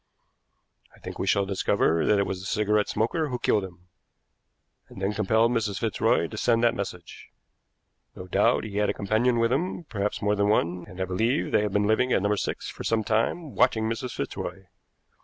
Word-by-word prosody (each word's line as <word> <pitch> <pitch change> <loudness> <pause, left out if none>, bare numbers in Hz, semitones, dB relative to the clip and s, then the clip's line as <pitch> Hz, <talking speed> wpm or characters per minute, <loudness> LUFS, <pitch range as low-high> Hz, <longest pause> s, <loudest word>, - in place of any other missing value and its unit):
I - - -21
think - - -8
we 95 - -2
shall 100 +2 +2
discover 90 -4 +1
that 105 - +4
it 100 - +2
was 95 - -4
the 95 - -7
cigarette 105 0 +1
smoker 135 +9 0
who 125 - -2
killed 105 -4 +1
him, 90 -1 -11 1.0
and - - -11
then 95 +2 -1
compelled 110 +3 +2
Mrs. 105 -5 -1
Fitzroy - - +1
to - - -9
send 115 -1 +2
that 120 -1 +4
message. 95 -5 -7 0.9
No 90 - -8
doubt 105 +6 +2
he 105 -2 -6
had 105 0 +2
a - - -1
companion 110 +5 +1
with 115 +1 +2
him, 175 +5 -2
perhaps 105 -8 -3
more 105 +1 +1
than 100 0 +1
one, 90 -4 0
and 95 -3 -12
I 95 - 0
believe 110 - 0
they - - +3
have 105 -2 -2
been 105 0 +2
living 110 +4 +2
at 95 - +2
No. 100 +1 +2
6 105 - -3
for - - -9
some 115 -1 +1
time 120 +8 -1
watching 110 -3 +2
Mrs. 120 +3 -4
Fitzroy. 90 +7 -5
105 Hz, 200 wpm, -26 LUFS, 95-115 Hz, 1.0 s, that